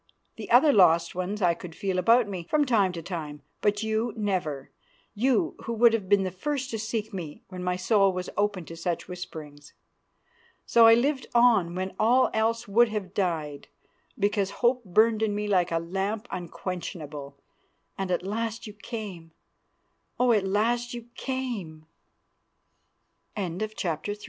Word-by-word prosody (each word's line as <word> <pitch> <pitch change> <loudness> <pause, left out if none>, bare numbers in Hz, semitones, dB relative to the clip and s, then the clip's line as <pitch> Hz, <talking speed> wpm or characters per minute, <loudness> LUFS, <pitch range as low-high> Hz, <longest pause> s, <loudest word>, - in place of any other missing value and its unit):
The - - -8
other 300 -3 +6
lost 170 -3 +5
ones 185 +3 -3
I 175 -1 +4
could 170 -1 -10
feel 190 -2 -1
about 230 +5 +4
me 185 -4 -6
from 300 -1 +3
time 210 -7 +3
to 165 -2 -6
time, 155 -5 -6 0.2
but 205 +1 +1
you 220 +1 -1
never, 180 -10 -2 0.4
you 265 - +1
who 235 - -2
would 230 0 +5
have 205 -5 -2
been 200 -1 +4
the 185 - -2
first 270 - -3
to 225 - -3
seek 220 0 -3
me 165 -6 -7
when 185 -1 -7
my 180 0 0
soul 195 +1 +3
was 180 0 -4
open 205 -4 0
to 165 - -9
such 170 +1 -3
whisperings. 155 -5 -9 0.9
So 230 -1 +6
I 225 - +8
lived 265 +2 0
on 225 -8 +4
when 185 +1 -3
all 245 +4 +4
else 225 +1 0
would 230 +4 +4
have 205 -4 -4
died, 160 -7 -2 0.5
because 205 -2 +1 0.2
hope 250 +1 +3
burned 220 +3 +3
in 215 -2 +1
me 210 0 -2
like 180 -4 +2
a 165 - +1
lamp 195 +7 -3
unquenchable. 160 -5 -6 0.6
And 195 -1 -3
at 180 0 0
last 225 +3 -3
you 210 - -8
came! 200 -6 -8 0.9
Oh! 250 -1 +4
at 205 -4 +2
last 235 +5 0
you 235 0 -9
c 240 -12 -4
200 Hz, 155 wpm, -27 LUFS, 180-230 Hz, 0.9 s, I